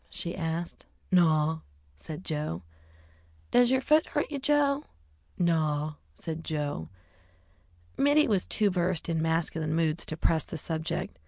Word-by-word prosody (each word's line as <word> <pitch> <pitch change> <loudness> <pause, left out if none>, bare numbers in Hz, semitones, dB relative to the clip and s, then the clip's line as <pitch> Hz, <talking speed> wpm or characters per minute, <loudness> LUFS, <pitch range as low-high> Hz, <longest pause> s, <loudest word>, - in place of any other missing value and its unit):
she 170 - -1
asked. 165 -1 -4 0.2
"Naw," 160 -3 +4 0.4
said 155 - -8
Joe. 150 - -3 0.9
"Does 245 -1 +5
yer 260 0 +3
foot 305 +3 +4
hurt 295 0 -1
you, 285 - -2
Joe?" 285 0 +2 0.5
"Naw," 155 -3 +1 0.2
said 165 0 -5
Joe. 145 - -3 1.1
Mittie 290 +2 +4
was 200 -5 +2
too 210 -2 +2
versed 175 -2 0
in 165 -1 0
masculine 160 -1 0
moods 165 0 +1
to 160 - -3
press 160 -1 +2
the 165 - -6
subject. 160 - -3
165 Hz, 135 wpm, -29 LUFS, 155-200 Hz, 1.1 s, Does